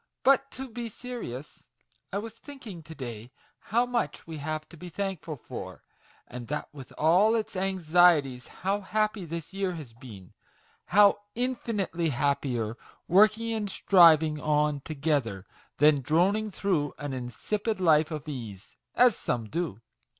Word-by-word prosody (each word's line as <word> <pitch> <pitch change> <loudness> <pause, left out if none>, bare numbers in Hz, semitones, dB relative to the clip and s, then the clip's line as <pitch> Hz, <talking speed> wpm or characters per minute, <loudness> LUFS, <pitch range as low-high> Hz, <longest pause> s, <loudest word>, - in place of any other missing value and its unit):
" - - -57
But 275 +1 +4
to 265 +1 -6
be 235 -1 -6
serious: 210 - -8 0.4
I 195 - -2
was 220 +2 -5
thinking, 230 - -10
to 160 +1 -11
day, 120 -4 -7 0.3
how 235 +4 +1
much 245 -1 -2
we 160 -1 -7
have 155 +1 -4
to - - -13
be 175 +2 -9
thankful 185 -4 -4
for; 130 - -9 0.4
and 120 -1 -8
that 150 +1 -4
with 135 -3 -11
all 185 +8 +4
its 220 -1 -2
anxieties 175 -8 +3
how 195 +3 -2
happy 215 0 -1
this 165 +2 -6
year 195 -2 -1
has 150 -9 -9
been 110 -7 -12 0.5
how 205 +2 +5 0.2
infinitely 225 -9 -1
happier, 125 -4 -1 0.3
working 215 +5 +4
and 210 -2 -2
striving 160 -6 +5
on 150 -1 +1
together, 140 - -1 0.3
than 150 -1 +5
droning 185 - +2
through 175 -7 -1
an 145 0 -5
insipid 200 - -3
life 160 -3 +4
of 155 -1 -6
ease, 115 -9 -8 0.2
as 245 -3 +5
some 115 -3 -3
do. 165 - -3
165 Hz, 145 wpm, -28 LUFS, 145-210 Hz, 0.5 s, how